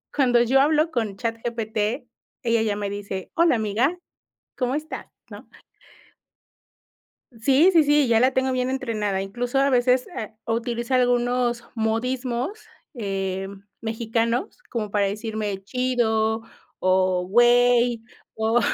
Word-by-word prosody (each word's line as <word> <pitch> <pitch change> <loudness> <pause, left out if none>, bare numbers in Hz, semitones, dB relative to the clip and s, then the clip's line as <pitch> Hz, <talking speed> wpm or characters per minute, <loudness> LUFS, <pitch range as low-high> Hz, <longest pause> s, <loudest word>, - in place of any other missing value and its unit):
cuando 245 -4 +4
yo 260 +3 +3
hablo 310 +3 +2
con 225 -7 -2
ChatGPT, 230 +1 -3 0.4
ella 230 -1 +2
ya 215 -2 0
me 205 -1 -3
dice: 200 -2 -6
"Hola, 335 -5 +4
amiga, 230 - 0 0.6
¿cómo 255 0 -1
estás?", 305 +1 -5 0.2
¿no? - - -11 1.8
Sí, 270 +9 +4
sí, 325 -2 +6
sí, 295 -1 +3
ya 230 -1 +4
la 255 +2 +4
tengo 260 0 0
bien 255 0 0
entrenada. 215 -7 -2
Incluso 240 +7 -2
a 275 +1 +3
veces 250 0 +2
ha 220 -1 -5 0.2
utiliza 235 +2 -1
algunos 245 -1 +1
modismos, 245 - -2 0.3
em, 195 -3 -4 0.2
mexicanos, 230 - -1
como 220 -3 -3
para 200 -1 +2
decirme 210 -1 -4
"chido", 225 -2 0 0.4
o, 185 -1 +2
"güey", 240 +1 +4 0.3
o 220 +2 +2
235 Hz, 120 wpm, -24 LUFS, 215-255 Hz, 1.8 s, sí